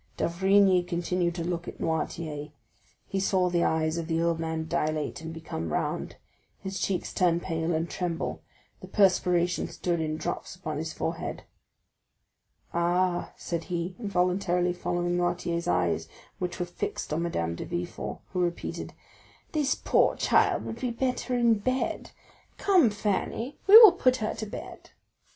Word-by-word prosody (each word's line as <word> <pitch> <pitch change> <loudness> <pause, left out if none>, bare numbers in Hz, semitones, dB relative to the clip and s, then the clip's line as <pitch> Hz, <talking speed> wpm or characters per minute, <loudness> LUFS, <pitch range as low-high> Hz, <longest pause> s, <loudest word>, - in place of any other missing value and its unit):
D'Avrigny 190 +1 +4
continued 175 0 -1
to 170 - -3
look 175 0 -3
at - - -7
Noirtier; 160 -2 -2 0.6
he 195 - -2
saw 185 -2 +2
the 170 -1 +2
eyes 160 +1 +1
of 165 - -4
the 165 -1 0
old 170 0 +1
man 160 -1 -3
dilate 155 -2 -1
and 160 0 -6
become 85 - -5
round, - - -2 0.4
his 190 0 -5
cheeks 190 -2 -2
turn 175 -2 +2
pale 165 -1 -2
and 165 0 0
tremble; 170 -1 -3 0.4
the - - -10
perspiration 180 -3 +2
stood 175 -2 -2
in 155 0 -2
drops - - -4
upon - - -5
his - - -3
forehead. - - -4 1.3
"Ah," 175 +1 +1
said 170 -1 -4
he, 175 0 -3
involuntarily 180 -3 +1
following 175 0 -1
Noirtier's 175 -1 -1
eyes, - - +1 0.3
which 180 -1 -3
were 175 - 0
fixed 175 -3 -4
on 160 - 0
Madame 85 - -1
de - - -5
Villefort, 175 0 -5
who 180 - -1
repeated: 175 -1 -2 0.6
"This 295 -3 +1
poor - - +2
child - - +2
would 225 - -6
be 250 - 0
better 250 +1 -1
in 235 -3 +3
bed. 255 +5 -1 0.5
Come, 365 - +4
Fanny, 210 +5 -2
we 410 +3 +11
will 450 -4 +11
put 255 -7 +2
her 220 -3 -2
to 220 - -5
bed." - - -8
M. - - -18
175 Hz, 155 wpm, -28 LUFS, 170-195 Hz, 1.3 s, we